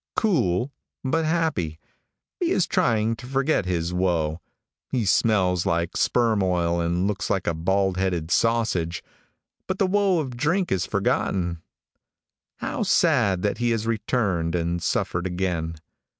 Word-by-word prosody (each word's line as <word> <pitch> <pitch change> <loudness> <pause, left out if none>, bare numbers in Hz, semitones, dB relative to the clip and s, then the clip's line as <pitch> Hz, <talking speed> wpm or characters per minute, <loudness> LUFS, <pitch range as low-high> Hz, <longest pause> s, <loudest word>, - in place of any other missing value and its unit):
Cool, 130 - +1 0.3
but 160 +4 0
happy. 155 - 0 0.6
He 350 -3 +1
is 190 - +2
trying 115 -1 +1
to 125 - -10
forget 135 -5 +1
his 85 -1 -1
woe. 85 -3 0 0.5
He 125 -5 0
smells 95 -3 +2
like 85 0 0
sperm 115 -4 +2
oil 85 -2 +1
and 85 +2 0
looks 100 -3 -2
like 95 -2 0
a - - +1
bald 95 +3 0
headed 90 -4 -1
sausage, 110 -8 +1 0.6
but 185 - -2
the 195 - +2
woe 195 -1 +2
of 135 -6 -3
drink 170 +9 0
is 90 -3 0
forgotten.' 85 -3 0 0.9
How - - -4
sad 95 -2 +2
that 105 - 0
he 120 0 +1
has 115 -1 0
returned 100 -7 0
and 85 0 -1
suffered 85 +2 -1
again. 90 -3 -2
95 Hz, 140 wpm, -24 LUFS, 85-125 Hz, 0.9 s, is